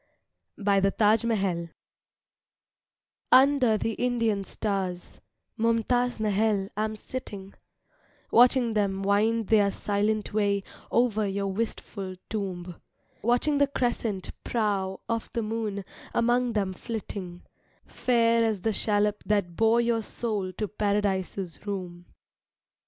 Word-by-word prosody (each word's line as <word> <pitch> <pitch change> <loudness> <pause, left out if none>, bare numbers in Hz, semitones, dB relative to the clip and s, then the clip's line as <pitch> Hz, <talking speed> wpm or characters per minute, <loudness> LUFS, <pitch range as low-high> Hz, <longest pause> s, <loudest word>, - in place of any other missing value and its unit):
BY 200 -1 +2
THE 195 0 +3
TAJ 215 +2 +3
MAHAL 190 -7 0 1.6
Under 255 -3 +5
the 225 - -1
Indian 230 -4 0
stars, 190 -3 -3 0.4
Mumtaz 230 +2 +1
Mahal, 210 -2 +1
I 215 +1 0
am 215 0 -4
sitting, 205 -5 -7 0.8
Watching 245 -1 +5
them 195 -2 0
wind 215 +2 +2
their 210 -2 +5
silent 205 +2 -1
way 200 -2 +1 0.3
Over 220 -3 +2
your 195 0 -2
wistful 200 -3 -4 0.2
Tomb; 185 -5 -4 0.4
Watching 245 +6 +2
the 285 - +4
crescent 240 -7 -2
prow 200 -4 -1
Of 230 -1 -2
the 230 - -1
moon 215 -3 -3 0.3
among 240 +1 +2
them 195 -3 0
flitting, 190 -4 -6 0.4
Fair 230 -2 +2
as 220 -4 0
the 220 +2 0
shallop 210 0 +1
that 200 -5 +1
bore 225 +3 +4
your 235 -1 +1
soul 210 -4 -3
To 210 - -3
Paradise's 200 -2 -2
Room. 180 -3 -5
210 Hz, 115 wpm, -27 LUFS, 195-230 Hz, 1.6 s, Under